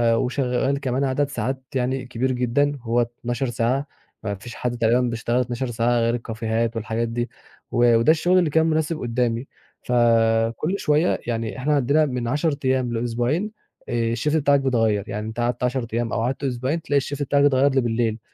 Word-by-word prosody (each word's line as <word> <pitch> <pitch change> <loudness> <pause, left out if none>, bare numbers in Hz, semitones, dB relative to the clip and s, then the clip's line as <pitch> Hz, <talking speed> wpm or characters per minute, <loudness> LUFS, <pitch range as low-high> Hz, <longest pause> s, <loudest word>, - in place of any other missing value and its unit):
وشغّال 130 +2 0
كمان 130 0 -1
عدد 140 +1 0
ساعات 130 -1 -3
يعني 130 0 -1
كبير 130 +1 -1
جدًا 135 +4 +1
هو 120 +1 +1
12 120 +2 -3
ساعة، 125 +5 0 0.4
ما 100 -2 -2
فيش 120 +5 -10
حد 120 -1 -3
تقريبًا 120 +2 +3
بيشتغل 120 0 0
12 125 +1 -2
ساعة 120 +1 +1
غير 115 +1 +1
الكافيهات 115 0 -2
والحاجات 115 +1 -2
دي 120 +1 -3 0.4
و 120 -1 +4
وده 115 +7 +5
الشُغل 175 +3 +3
اللي 175 -4 +2
كان 160 +2 +3
مناسب 160 0 0
قُدّامي. 120 +1 -1 0.4
فكل 115 - +2
شوية 150 +4 +2
يعني 115 0 -2
إحنا 145 +4 0
عندنا 145 +3 +3
من 125 -4 -3
10 150 +4 0
أيام 130 -2 +1
لأسبوعين 120 - -1 0.4
آآ 115 -1 0
الShift 150 +6 0
بتاعك 140 -2 +3
بيتغيّر، 115 -6 +1
يعني 105 +2 -4
أنت 110 +2 -6
قعدت 120 +1 -1
10 125 -1 0
أيام 115 -1 -1
أو - - 0
قعدت 130 +4 -2
أسبوعين، 130 +5 -1
تلاقي 145 -1 +1
الShift 145 +1 -5
بتاعك 140 +1 +2
اتغيّر 140 0 +4
لي 135 -1 +2
بالليل 115 -1 0
125 Hz, 180 wpm, -23 LUFS, 115-140 Hz, 0.4 s, وده